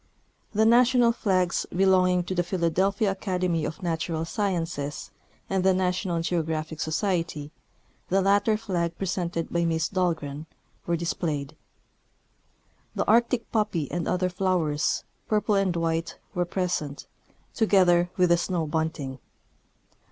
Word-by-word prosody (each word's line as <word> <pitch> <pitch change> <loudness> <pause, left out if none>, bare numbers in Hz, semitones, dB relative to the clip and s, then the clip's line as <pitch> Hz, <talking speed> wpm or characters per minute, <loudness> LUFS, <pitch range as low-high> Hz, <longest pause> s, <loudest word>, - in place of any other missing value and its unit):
The 220 +1 +2
national 240 +1 +5
flags 185 -6 0
belonging 185 -1 +3
to 180 - -4
the 175 - +1
Philadelphia 190 +3 +1
Academ}^ 180 -5 -1
of 160 - -8
Natural 165 -1 -2
Sciences 165 -7 -3 0.4
and 190 -1 0
the 190 -1 +4
National 180 -2 0
Geographic 160 -2 -2
Societ}^ 160 -3 -1 0.6
(the 195 - +3
latter 200 +3 +3
flag 175 -6 -2
presented 175 -3 -2
by 170 0 +2
Miss 165 -1 0
Dahlgren) 160 -5 -2 0.4
were 170 -1 +1
displayed. 155 -3 -3 1.4
The - - 0
arctic 235 +1 +2
poppy 205 -9 0
and 175 -2 -2
other 180 0 +1
flowers, 175 -5 0 0.2
purple 210 0 +1
and 195 -3 +2
white, 165 0 -1 0.2
were 175 0 0
present, 175 -6 -2 0.5
to 220 - +1
gether 175 -3 +4
with 180 -1 +4
the 170 - +5
snowbunting. 160 -5 -2
175 Hz, 120 wpm, -26 LUFS, 165-195 Hz, 1.4 s, national